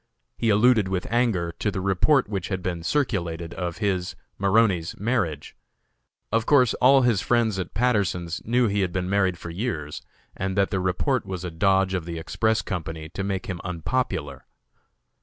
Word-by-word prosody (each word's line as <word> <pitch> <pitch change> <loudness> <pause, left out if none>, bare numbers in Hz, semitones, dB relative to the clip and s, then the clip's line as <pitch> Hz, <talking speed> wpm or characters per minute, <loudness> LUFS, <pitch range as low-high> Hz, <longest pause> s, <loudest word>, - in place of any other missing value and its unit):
He 115 - 0
alluded 110 0 +4
with 95 -1 -2
anger 110 -9 +1
to 105 - 0
the 95 - -3
report 100 +10 +2
which 100 -4 -3
had 95 -2 -3
been 85 -2 -3
circulated 85 - -1
of 85 -2 -4
his, 95 -4 -1 0.2
(Maroney's) 100 -4 +2
marriage. 100 - -1 0.8
Of 115 +1 +1
course 130 -6 +5
all 135 +1 +6
his 115 -6 +2
friends 115 -5 +1
at 95 - -5
Patterson's 100 -7 0
knew 120 +2 +2
he 100 0 0
had 90 -2 0
been 90 +1 -2
married 95 -3 +2
for 85 - -8
years, 85 - -4 0.3
and 95 +1 -3
that 100 -1 +2
the 95 - 0
report 95 +7 0
was 95 -1 -5
a 90 - -4
dodge 95 +3 +2
of 90 -3 -2
the 85 -1 -5
Express 110 +7 0
Company 80 -4 -5
to 95 +4 -5
make 95 -1 -2
him 90 -3 -5
unpopular. 85 - -3
95 Hz, 175 wpm, -25 LUFS, 85-110 Hz, 0.8 s, all